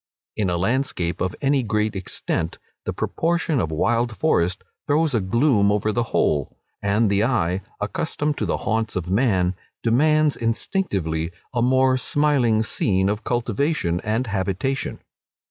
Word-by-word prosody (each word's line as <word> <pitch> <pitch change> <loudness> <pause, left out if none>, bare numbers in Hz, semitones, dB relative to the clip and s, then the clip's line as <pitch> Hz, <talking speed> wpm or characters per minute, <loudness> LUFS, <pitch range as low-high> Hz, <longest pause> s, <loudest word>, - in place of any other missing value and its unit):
In 100 -4 0
a 85 - 0
landscape 95 -4 -1
of 95 -1 -1
any 140 0 +2
great 105 -2 -1
extent, 85 -3 -3 0.3
the - - -1
proportion 165 -3 0
of 80 - -1
wild 115 +7 0
forest 90 - +1 0.2
throws 150 0 +2
a 115 - +2
gloom 105 +1 +3
over 105 +1 +1
the 120 - 0
whole, 75 -3 0 0.2
and 100 +3 +2
the 100 +1 +2
eye, 95 -7 +1 0.2
accustomed 150 +7 -2
to - - -1
the - - 0
haunts 110 +2 0
of 90 -1 -3
man, 95 -5 +2 0.3
demands 150 +5 +3
instinctively 100 - -1 0.2
a 120 - 0
more 130 +1 +3
smiling 125 -6 +2
scene 95 -3 +1
of 105 +2 -2
cultivation 120 - 0
and 110 +4 0
habitation. 100 +5 -2
110 Hz, 145 wpm, -23 LUFS, 95-130 Hz, 0.3 s, gloom